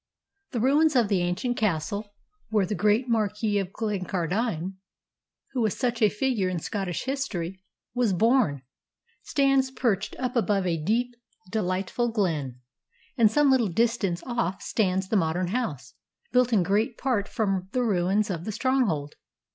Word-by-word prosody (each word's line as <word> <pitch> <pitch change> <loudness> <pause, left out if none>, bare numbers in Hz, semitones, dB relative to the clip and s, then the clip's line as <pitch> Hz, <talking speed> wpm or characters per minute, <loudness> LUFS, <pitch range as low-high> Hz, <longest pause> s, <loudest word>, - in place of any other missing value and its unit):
The 245 - -3
ruins 290 +5 +3
of 235 -5 +3
the 195 -4 +2
ancient 180 +8 -1
castle, 205 +2 -1 0.3
where 210 -3 +2
the 205 - -3
great 210 +6 +2
Marquis 210 -2 +1
of 190 -2 -3
Glencardine, 190 -2 -2 0.7
who 260 -2 -1
was 215 -3 0
such 240 -3 -1
a 215 - +6
figure 210 -3 0
in 180 - -2
Scottish 185 0 -3
history, 195 -10 -3 0.3
was 245 -4 +2
born, 210 - +2 0.6
stands 275 -2 +2
perched 225 -6 -1
up 250 -1 -3
above 205 -5 +1
a 165 -3 -1
deep, 240 +7 +1 0.4
delightful 200 +3 -1
glen; 155 - -1 0.5
and 230 -5 +5
some 290 +4 +4
little 250 -4 +3
distance 200 -3 0
off 235 -6 -2
stands 190 -3 0
the 220 - +2
modern 175 +1 0
house, 195 - -3 0.4
built 250 -1 +3
in 205 -6 +4
great 210 +5 0
part 235 -6 0
from 195 -4 -1
the 250 - 0
ruins 200 0 +1
of 170 -1 -4
the 215 - -2
stronghold." 210 - 0
210 Hz, 150 wpm, -26 LUFS, 185-240 Hz, 0.7 s, a